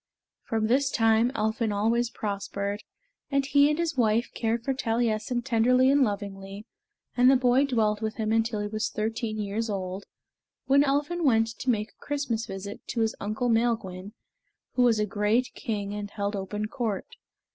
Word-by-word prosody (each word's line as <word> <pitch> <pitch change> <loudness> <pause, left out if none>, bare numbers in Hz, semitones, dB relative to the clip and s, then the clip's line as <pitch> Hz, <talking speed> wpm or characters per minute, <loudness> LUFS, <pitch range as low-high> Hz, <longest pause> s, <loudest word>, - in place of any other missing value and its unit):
From 220 -1 0
this 265 +4 +2
time 225 0 +3
Elphin 220 +1 0
always 225 +4 +1
prospered, 200 -1 -4 0.5
and 275 -1 +1
he 285 +1 +4
and 300 - 0
his 335 -3 -1
wife 230 -1 +2
cared 230 0 -1
for 270 - 0
Taliessin 235 0 -1
tenderly 250 +2 +4
and 285 0 +4
lovingly, 200 -1 -4 0.5
and 250 +1 +6
the 270 - +6
boy 255 +2 +3
dwelt 215 -5 +1
with 220 0 -2
him 220 -1 -1
until 225 -1 +1
he 205 - -2
was 215 +1 -2
thirteen 220 0 -3
years 215 +2 -2
old, 190 -1 -4 0.6
when 280 +1 +5
Elphin 295 +5 0
went 225 -5 +3
to 245 +3 -5
make 215 -3 0
a - - -21
Christmas 255 -6 -2
visit 195 +1 -7
to 235 - -2
his 225 0 +1
uncle 215 +4 -2
Maelgwyn, 220 -5 0 0.6
who 250 - +1
was 240 -3 +4
a 210 - +1
great 210 +4 +1
king 205 -3 -4
and 205 -1 -5
held 200 0 -3
open 205 +2 -3
court. 225 -5 -3
225 Hz, 170 wpm, -27 LUFS, 210-250 Hz, 0.6 s, and